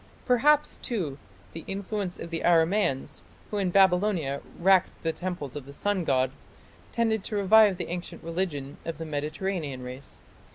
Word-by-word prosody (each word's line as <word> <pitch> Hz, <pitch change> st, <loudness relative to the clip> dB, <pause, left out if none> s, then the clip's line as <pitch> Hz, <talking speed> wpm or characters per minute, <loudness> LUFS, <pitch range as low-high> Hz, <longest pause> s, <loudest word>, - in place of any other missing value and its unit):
Perhaps, 285 Hz, +4 st, +3 dB
too, 165 Hz, -, -3 dB, 0.3 s
the 165 Hz, -, -7 dB
influence 195 Hz, -1 st, -3 dB
of 170 Hz, -, -8 dB
the 165 Hz, -, -2 dB
Aramaeans, 165 Hz, -, +2 dB, 0.3 s
who 210 Hz, -, -1 dB
in 190 Hz, -2 st, +1 dB
Babylonia 180 Hz, -6 st, +3 dB, 0.2 s
wrecked 190 Hz, +1 st, +4 dB
the 165 Hz, -1 st, 0 dB
temples 175 Hz, -8 st, -5 dB
of 140 Hz, -2 st, -7 dB
the 140 Hz, -, -10 dB
sun 195 Hz, +2 st, -1 dB
god, 130 Hz, -2 st, +2 dB, 0.6 s
tended 225 Hz, -3 st, +1 dB
to 215 Hz, -, -4 dB
revive 205 Hz, -1 st, +6 dB
the 180 Hz, -, -4 dB
ancient 175 Hz, 0 st, -6 dB
religion 165 Hz, -5 st, -3 dB
of 165 Hz, -2 st, -5 dB
the 165 Hz, -, -5 dB
Mediterranean 155 Hz, -1 st, -3 dB
race. 130 Hz, +2 st, -9 dB
175 Hz, 155 wpm, -27 LUFS, 145-200 Hz, 0.6 s, revive